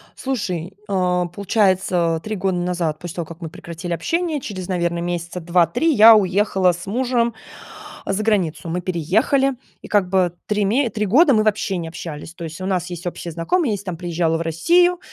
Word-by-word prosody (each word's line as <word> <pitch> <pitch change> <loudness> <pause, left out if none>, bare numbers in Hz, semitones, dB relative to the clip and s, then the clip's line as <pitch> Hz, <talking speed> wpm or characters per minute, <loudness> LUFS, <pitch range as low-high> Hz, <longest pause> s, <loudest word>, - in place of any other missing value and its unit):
Слушай, 190 -10 -3 0.2
э, 180 -2 +1
получается, 185 -5 +1
3 215 0 -3
года 190 -1 -1
назад, 175 -3 -1
после 175 -2 -7
того, 170 - -3
как 170 +2 -12
мы 165 - -5
прекратили 170 +2 -6
общение, 320 - -1
через, 185 -6 -6
наверное, 170 -2 -1
месяца 175 0 -3
2-3 175 - +2
я 225 -1 +9
уехала 190 -1 +2
с 175 +2 -7
мужем 235 +1 0 0.7
за 195 +2 -1
границу. 180 -6 0
Мы 180 +2 -2
переехали, 200 - +1 0.3
и - - -10
как 200 -4 +2
бы 185 -2 +2
3 210 -1 +1
ме 240 +4 +2
3 210 +1 -2
года 275 - +5
мы 215 -1 +3
вообще 205 -3 0
не 165 -1 -4
общались, 160 -1 -8
то 170 - -9
есть 165 +3 -7
у - - -3
нас 180 -2 -1
есть 175 +1 -7
общие 175 -1 -5
знакомые, 230 - 0
если 200 0 -5
там 180 -3 -4
приезжала 170 -1 0
в - - -4
Россию, 345 - +3
185 Hz, 185 wpm, -21 LUFS, 170-215 Hz, 0.7 s, я